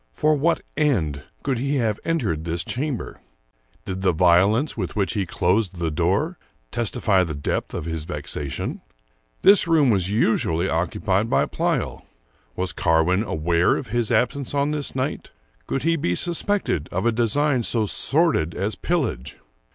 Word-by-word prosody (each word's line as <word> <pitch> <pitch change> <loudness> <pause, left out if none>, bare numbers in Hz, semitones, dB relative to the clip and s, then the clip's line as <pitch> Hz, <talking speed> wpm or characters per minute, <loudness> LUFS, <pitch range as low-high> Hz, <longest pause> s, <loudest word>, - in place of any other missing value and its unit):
For 155 0 +2
what 160 +4 +1
end 85 - 0 0.2
could 135 -4 -1
he 140 +3 -1
have 110 -6 0
entered 115 - -1
this 85 0 -2
chamber? 135 - -4 0.6
Did 95 0 -4
the 95 -2 +2
vio 90 +3 +5
lence 125 +8 -1
with 95 -6 -4
which 100 0 0
he 100 -5 -1
closed 95 0 0
the 85 -2 -1
door 95 - 0 0.3
testify 105 -4 +1
the 80 -4 -4
depth 70 - -3
of - - -4
his 80 -2 -4
vexation? 75 -2 -4 0.6
This 200 -3 +7
room 155 -6 +4
was 95 -3 +1
usually 95 -5 +1
occupied 95 +5 0
by - - +3
Pleyel. - - -2 0.5
Was 95 0 -2
Carwin 80 +3 +2
aware 85 -3 +1
of 125 - -6
his 120 0 -1
absence 135 +4 0
on 140 +1 +1
this 150 -3 -3
night? 135 +3 -3 0.4
Could 135 - -2
he 165 +1 +2
be 90 - 0
suspected 175 - 0
of 95 +5 -2
a 120 - +4
design 125 +4 +1
so 115 -1 +1
sordid 135 - +1
as 100 +4 -1
pillage? 130 - -2
105 Hz, 160 wpm, -23 LUFS, 85-140 Hz, 0.6 s, This